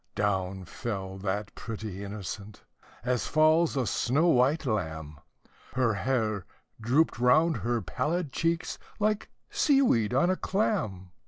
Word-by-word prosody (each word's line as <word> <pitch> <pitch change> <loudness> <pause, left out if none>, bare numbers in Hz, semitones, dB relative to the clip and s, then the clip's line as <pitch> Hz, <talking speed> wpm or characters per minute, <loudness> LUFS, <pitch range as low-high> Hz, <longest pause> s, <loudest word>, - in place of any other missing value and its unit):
Down 95 -2 -1
fell 95 -3 -5
that 100 +1 -3
pretty 105 -4 -6
innocent, 100 0 -7 0.4
as 125 -1 0
falls 155 0 +4
a 130 - +1
snow 145 +10 +2
white 140 +3 +3
lamb, 80 - -3 0.6
Her 125 -3 +2
hair 110 -3 -1 0.3
drooped 125 +4 +2
round 150 +6 +4
her 120 0 -1
pallid 155 +4 -1
cheeks, 165 +3 -1 0.2
like 215 0 0 0.2
sea 300 -10 +4
weed 115 - +2
on 155 +9 +3
a - - +1
clam. 145 - -1
120 Hz, 130 wpm, -28 LUFS, 100-155 Hz, 0.6 s, falls